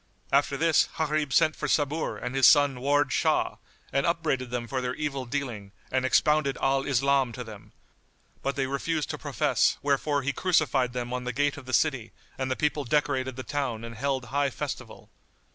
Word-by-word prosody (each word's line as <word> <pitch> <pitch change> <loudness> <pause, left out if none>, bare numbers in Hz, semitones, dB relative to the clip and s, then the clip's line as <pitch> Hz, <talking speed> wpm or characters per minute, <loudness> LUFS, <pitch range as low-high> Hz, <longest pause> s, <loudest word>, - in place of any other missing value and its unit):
After 140 0 +2
this, 165 0 +3
Gharib 155 -2 0
sent 155 +4 +3
for - - -3
Sabur 150 +2 0
and 125 +1 -5
his 135 -1 +6
son 145 -4 +5
Ward 145 +1 +2
Shah, - - +1 0.4
and 140 0 +2
upbraided 155 -7 0
them 120 -1 -3
for 130 +1 -2
their 125 0 -2
evil 140 -3 -3
dealing 120 -7 -4 0.2
and 130 0 +1
expounded 150 +1 +2
Al 135 0 +1
Islam 135 -1 +2
to 125 - -6
them; 110 -3 -12 0.7
but 140 - -2
they 135 -2 0
refused 145 +3 -2
to - - -6
profess - - +1
wherefore 145 0 +1
he 140 +1 -1
crucified 135 -8 +1
them 125 0 -4
on 125 0 -3
the 125 - -1
gate 145 +3 0
of 140 -3 -11
the - - -5
city 135 -8 +1 0.2
and 130 -1 -3
the 130 - 0
people 150 0 0
decorated 130 -1 0
the 130 - -6
town 130 -6 -3
and 115 0 -7
held 130 +2 -2
high 140 0 +2
festival. - - -7
135 Hz, 190 wpm, -27 LUFS, 125-145 Hz, 0.7 s, his